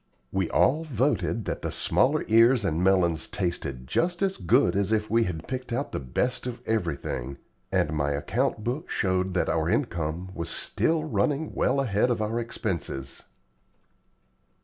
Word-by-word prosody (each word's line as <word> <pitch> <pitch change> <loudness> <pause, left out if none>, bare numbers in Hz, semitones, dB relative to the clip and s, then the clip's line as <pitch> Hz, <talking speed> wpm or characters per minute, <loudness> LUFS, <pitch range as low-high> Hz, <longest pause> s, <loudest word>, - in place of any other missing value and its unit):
We 95 -3 0
all 155 +5 +3
voted 130 -5 0
that - - -3
the - - -3
smaller - - +2
ears 115 +1 +5
and 85 -1 0
melons 85 -4 +2
tasted 75 -9 -3
just 175 - 0
as 195 -1 0
good 85 - +3
as 100 +1 +1
if 110 -1 0
we 115 0 +4
had 80 -3 -5
picked 130 -1 -5
out 130 +5 -2
the - - -2
best 125 - -1
of 120 -1 -5
everything, 70 - -2 0.3
and 75 - +1
my 70 -2 0
account 75 +8 -1
book 130 +8 -3
showed 95 -1 0
that 90 - +1
our - - +1
income 85 +3 -1
was 85 -1 -4
still 160 - 0
running 145 +3 0
well 140 - +1
ahead 120 -2 +2
of 120 - 0
our 110 +2 -1
expenses. 90 - -4
105 Hz, 160 wpm, -27 LUFS, 85-125 Hz, 0.3 s, ears